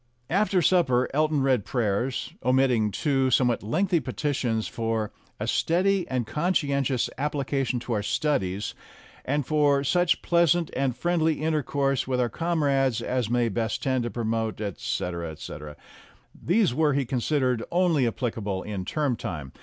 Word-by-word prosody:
After 195 Hz, -1 st, +2 dB
supper 135 Hz, -9 st, +3 dB
Elton 155 Hz, -1 st, +2 dB
read 130 Hz, -6 st, +2 dB
prayers, 120 Hz, +3 st, -1 dB
omitting 125 Hz, -3 st, +3 dB
two 135 Hz, +4 st, +1 dB
somewhat 125 Hz, -1 st, +2 dB
lengthy 175 Hz, -, +1 dB
petitions, 125 Hz, -3 st, -1 dB
for 115 Hz, -2 st, -2 dB, 0.3 s
"a -, -, -2 dB
steady 185 Hz, +2 st, +1 dB
and 125 Hz, -3 st, -1 dB
conscientious 140 Hz, -4 st, 0 dB
application 135 Hz, -3 st, -1 dB
to 120 Hz, -, -3 dB
our 105 Hz, -, 0 dB
studies," 105 Hz, -6 st, -1 dB, 0.5 s
and 145 Hz, +1 st, 0 dB
for 145 Hz, -2 st, +2 dB
"such 175 Hz, +5 st, +2 dB
pleasant 170 Hz, -1 st, +2 dB
and 130 Hz, -2 st, 0 dB
friendly 160 Hz, -1 st, +1 dB
intercourse 140 Hz, -4 st, 0 dB
with 130 Hz, -1 st, 0 dB
our 120 Hz, -1 st, +1 dB
com 165 Hz, +6 st, -1 dB
rades 135 Hz, -4 st, +2 dB
as 125 Hz, -3 st, -1 dB
may 120 Hz, 0 st, +2 dB
best 110 Hz, 0 st, -2 dB
tend 130 Hz, -2 st, +1 dB
to 120 Hz, -, -2 dB
promote," 115 Hz, -2 st, -2 dB
etc., 90 Hz, -4 st, -3 dB
etc. 75 Hz, -1 st, -9 dB, 0.6 s
These 185 Hz, -, +1 dB
were, 150 Hz, +1 st, +2 dB
he 140 Hz, -1 st, 0 dB
considered, 125 Hz, -1 st, 0 dB
only 170 Hz, -7 st, +2 dB
applicable 110 Hz, -5 st, -3 dB
in 100 Hz, -3 st, -5 dB
term 145 Hz, -1 st, 0 dB
time. 70 Hz, -10 st, -6 dB
130 Hz, 145 wpm, -26 LUFS, 115-150 Hz, 0.6 s, supper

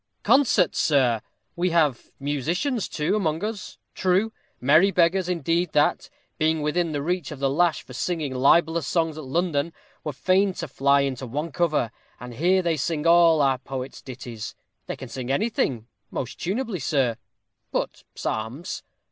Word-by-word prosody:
_ -, -, -48 dB
Concert, 250 Hz, -, +4 dB
sir! 130 Hz, -7 st, +3 dB, 0.3 s
we 180 Hz, +1 st, +1 dB
have 155 Hz, -7 st, +1 dB
musicians, 170 Hz, -, -1 dB
too, 150 Hz, +6 st, 0 dB
among 165 Hz, -4 st, 0 dB
us. 215 Hz, -2 st, -5 dB, 0.2 s
True, 190 Hz, +4 st, +1 dB, 0.3 s
merry 155 Hz, +9 st, +5 dB
beggars, 180 Hz, 0 st, +2 dB
indeed, 170 Hz, 0 st, 0 dB
that, 145 Hz, -, +2 dB, 0.3 s
being 155 Hz, 0 st, +2 dB
within 165 Hz, +2 st, 0 dB
the 145 Hz, -2 st, -2 dB
reach 180 Hz, -1 st, -1 dB
of 150 Hz, -, -6 dB
the 135 Hz, 0 st, 0 dB
lash 170 Hz, +2 st, +2 dB
for 125 Hz, -, -12 dB
singing 150 Hz, +1 st, -2 dB
libellous 160 Hz, +4 st, +3 dB
songs 165 Hz, -3 st, 0 dB
at 155 Hz, -, -7 dB
London, 165 Hz, +1 st, 0 dB, 0.3 s
were 150 Hz, -, -2 dB
fain 185 Hz, +7 st, +2 dB
to 165 Hz, -, -5 dB
fly 140 Hz, +1 st, +3 dB
into 130 Hz, -2 st, -2 dB
one 150 Hz, +7 st, -3 dB
cover, 155 Hz, -9 st, +1 dB, 0.3 s
and 125 Hz, 0 st, -8 dB
here 180 Hz, +8 st, +2 dB
they 165 Hz, -2 st, +1 dB
sing 150 Hz, +2 st, -2 dB
all 165 Hz, -2 st, +6 dB
our 135 Hz, -2 st, +2 dB
poets' 130 Hz, 0 st, -6 dB
ditties. 120 Hz, -4 st, -7 dB, 0.3 s
They -, -, -3 dB
can 130 Hz, -, -8 dB
sing 125 Hz, +1 st, -6 dB
anything, 135 Hz, -, 0 dB, 0.2 s
most 130 Hz, -1 st, -5 dB
tunably, 200 Hz, -, -2 dB
sir, 130 Hz, -6 st, +1 dB, 0.5 s
but -, -, -3 dB
psalms. 115 Hz, -, -4 dB
155 Hz, 160 wpm, -25 LUFS, 135-175 Hz, 0.5 s, all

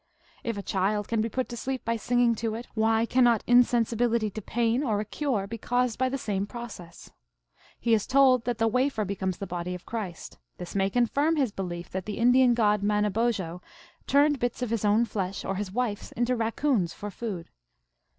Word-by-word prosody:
If 230 Hz, -3 st, -3 dB
a 200 Hz, -, -4 dB
child 200 Hz, +2 st, 0 dB
can 230 Hz, -2 st, 0 dB
be 225 Hz, -, -1 dB
put 255 Hz, +2 st, -2 dB
to 240 Hz, -, -5 dB
sleep 260 Hz, +2 st, -4 dB
by 230 Hz, -, 0 dB
singing 240 Hz, +1 st, +2 dB
to 220 Hz, -1 st, -2 dB
it, 235 Hz, +2 st, -6 dB
why 225 Hz, +1 st, +2 dB
cannot 240 Hz, -2 st, +3 dB
insensibility 235 Hz, -2 st, +3 dB
to 215 Hz, -, -6 dB
pain 235 Hz, +4 st, 0 dB
or 215 Hz, -7 st, 0 dB
a 210 Hz, -, -2 dB
cure 245 Hz, -5 st, -1 dB
be 230 Hz, +3 st, -7 dB
caused 245 Hz, 0 st, 0 dB
by 260 Hz, 0 st, +2 dB
the 275 Hz, -, -2 dB
same 200 Hz, -5 st, -2 dB
process? 215 Hz, -8 st, -9 dB, 0.7 s
He 235 Hz, -, +1 dB
is 215 Hz, -2 st, +2 dB
told 260 Hz, -2 st, +4 dB
that 245 Hz, -2 st, -1 dB
the 225 Hz, -, +2 dB
wafer 250 Hz, -1 st, +1 dB
becomes 190 Hz, -2 st, -2 dB
the 200 Hz, -, -5 dB
body 180 Hz, 0 st, -4 dB
of 180 Hz, -, -11 dB
Christ; 200 Hz, -8 st, -6 dB, 0.2 s
this 180 Hz, -, -7 dB
may 195 Hz, -1 st, +1 dB
confirm 280 Hz, +8 st, +2 dB
his 270 Hz, -7 st, +1 dB
belief 175 Hz, -3 st, -5 dB
that 190 Hz, +1 st, -4 dB
the 210 Hz, -, -4 dB
Indian 245 Hz, +1 st, +5 dB
god 210 Hz, -3 st, +2 dB
Manobozho 210 Hz, -3 st, 0 dB, 0.5 s
turned 285 Hz, 0 st, +4 dB
bits 245 Hz, +1 st, -2 dB
of 235 Hz, -, -3 dB
his 230 Hz, -3 st, -1 dB
own 210 Hz, +3 st, +3 dB
flesh 195 Hz, -3 st, -4 dB
or -, -, -1 dB
his 195 Hz, 0 st, -4 dB
wife 220 Hz, -2 st, -1 dB
s -, -, -11 dB
into 240 Hz, +2 st, 0 dB
raccoons, 230 Hz, -, 0 dB
for 205 Hz, 0 st, -6 dB
food. 195 Hz, -5 st, -6 dB
225 Hz, 200 wpm, -27 LUFS, 200-245 Hz, 0.7 s, Indian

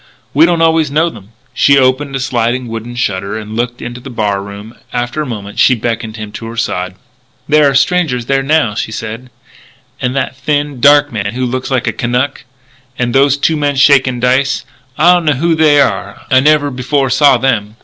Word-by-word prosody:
We 155 Hz, +4 st, +5 dB
don't 170 Hz, -1 st, +1 dB
always 160 Hz, -2 st, +2 dB
know 160 Hz, +4 st, +1 dB
them." 100 Hz, -7 st, -14 dB, 0.2 s
She 140 Hz, 0 st, +4 dB
opened 135 Hz, +2 st, +1 dB
a -, -, -2 dB
sliding 120 Hz, -1 st, -1 dB
wooden 115 Hz, +1 st, -7 dB
shutter 100 Hz, -3 st, -2 dB
and 110 Hz, 0 st, -7 dB
looked 120 Hz, +1 st, -3 dB
into 120 Hz, +1 st, -7 dB
the 135 Hz, -, -9 dB
bar 105 Hz, -5 st, -1 dB
room. 100 Hz, +3 st, -10 dB, 0.2 s
After 120 Hz, +5 st, -2 dB
a 150 Hz, -, -4 dB
moment 105 Hz, -4 st, -7 dB
she 130 Hz, -, +5 dB
beckoned 115 Hz, -1 st, -4 dB
him 105 Hz, -1 st, -7 dB
to 115 Hz, +2 st, -8 dB
her 115 Hz, +1 st, -8 dB
side. 90 Hz, -4 st, -2 dB, 0.5 s
"There 150 Hz, -1 st, +4 dB
are 135 Hz, -, -2 dB
strangers 140 Hz, -5 st, +1 dB
there 135 Hz, +2 st, +1 dB
now," 135 Hz, -5 st, +1 dB
she 110 Hz, -, -4 dB
said, 110 Hz, +3 st, -7 dB, 0.4 s
" 130 Hz, -1 st, -29 dB
that 130 Hz, 0 st, -2 dB
thin, 145 Hz, +1 st, -2 dB
dark 145 Hz, +1 st, +5 dB
man 100 Hz, 0 st, -3 dB
who 130 Hz, 0 st, -1 dB
looks 130 Hz, +1 st, -3 dB
like 130 Hz, -3 st, 0 dB
a -, -, -1 dB
Kanuk. 125 Hz, +4 st, -2 dB, 0.5 s
And 120 Hz, -1 st, -1 dB
those 140 Hz, +1 st, +3 dB
two 160 Hz, +3 st, +1 dB
men 145 Hz, -2 st, -1 dB
shaking 130 Hz, -2 st, +3 dB
dice. 130 Hz, +3 st, +1 dB, 0.3 s
I 175 Hz, +3 st, +5 dB
don't 175 Hz, -2 st, 0 dB
know 150 Hz, -, +3 dB
who 165 Hz, +5 st, 0 dB
they 155 Hz, -2 st, +4 dB
are. 140 Hz, -, -1 dB
I 130 Hz, -, +6 dB
never 145 Hz, 0 st, +2 dB
before 135 Hz, +1 st, -1 dB
saw 140 Hz, 0 st, +4 dB
them." 115 Hz, -5 st, -1 dB
130 Hz, 200 wpm, -13 LUFS, 115-145 Hz, 0.5 s, I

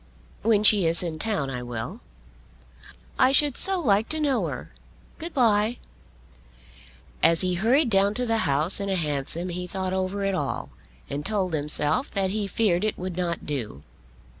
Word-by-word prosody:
"When 215 Hz, -1 st, +2 dB
she 205 Hz, -5 st, +6 dB
is 165 Hz, +2 st, +2 dB
in 160 Hz, -3 st, -4 dB
town 180 Hz, -11 st, -1 dB
I 125 Hz, -1 st, -4 dB
will." 120 Hz, -2 st, -6 dB, 1.2 s
"I 255 Hz, 0 st, +5 dB
should 290 Hz, -1 st, +3 dB
so 385 Hz, -1 st, +4 dB
like 220 Hz, -, +2 dB
to 315 Hz, -, -2 dB
know 285 Hz, -4 st, +1 dB
her. -, -, -7 dB, 0.5 s
Good 335 Hz, +2 st, -6 dB
bye." 230 Hz, -3 st, +2 dB, 1.4 s
As 165 Hz, 0 st, +5 dB
he 185 Hz, -1 st, 0 dB
hurried 235 Hz, -, +2 dB
down 200 Hz, +1 st, +3 dB
to 250 Hz, -, -1 dB
the 225 Hz, -1 st, 0 dB
House 150 Hz, +8 st, +2 dB
in 200 Hz, 0 st, -3 dB
a 190 Hz, -, +1 dB
hansom 155 Hz, +2 st, -2 dB
he 180 Hz, +1 st, -5 dB
thought 190 Hz, 0 st, -3 dB
over 190 Hz, +1 st, -2 dB
it 195 Hz, -, 0 dB
all, 145 Hz, -7 st, -3 dB, 0.4 s
and 145 Hz, +1 st, -4 dB
told 190 Hz, -3 st, -2 dB
himself 150 Hz, -, 0 dB
that 195 Hz, -2 st, -1 dB
he 210 Hz, 0 st, -2 dB
feared 195 Hz, -3 st, +1 dB
it 215 Hz, -, -1 dB
would 180 Hz, -1 st, -5 dB
not 175 Hz, -2 st, -3 dB
do. 115 Hz, -, -5 dB
190 Hz, 170 wpm, -25 LUFS, 165-220 Hz, 1.4 s, she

